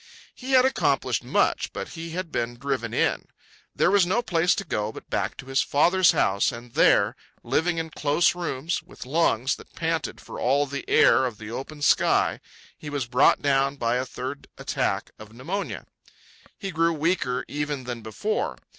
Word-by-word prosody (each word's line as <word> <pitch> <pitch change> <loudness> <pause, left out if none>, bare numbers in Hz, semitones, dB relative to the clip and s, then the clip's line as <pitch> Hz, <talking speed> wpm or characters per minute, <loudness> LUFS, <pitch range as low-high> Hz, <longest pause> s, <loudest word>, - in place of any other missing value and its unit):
He 265 +1 -5
had 255 0 +6
accomplished 265 - +1
much, - - +1
but - - -5
he 165 0 -7
had 170 0 -5
been 120 0 -2
driven 130 -3 -2
in. - - 0 0.5
There 175 - +3
was 200 -2 +5
no 190 +7 +1
place 175 -3 +2
to - - -3
go 105 -8 -2
but - - -12
back - - -1
to - - -9
his 135 +1 +1
father's 175 +5 +4
house, 100 - +2
and 115 0 -10
there, - - +4 0.3
living 175 +1 0
in 165 -1 -3
close 150 +3 +2
rooms 170 -2 -3
with - - -12
lungs 130 -4 +1
that - - -16
panted - - -2
for - - -9
all 140 +3 +2
the 140 0 -6
air 130 - +5
of 115 -4 -7
the 110 +1 -8
open 145 +4 -6
sky, - - +3 0.4
he 150 - -9
was 145 -3 -2
brought 125 +5 +3
down 140 0 +2
by 120 -2 0
a 130 - 0
third 130 +3 -6
attack - - -2
of 110 0 -12
pneumonia. 170 - -4 0.7
He 195 - -5
grew 165 0 +2
weaker 155 -5 0
even 145 -2 -3
than 120 -2 -5
before. 110 - -2
145 Hz, 180 wpm, -25 LUFS, 125-170 Hz, 0.7 s, had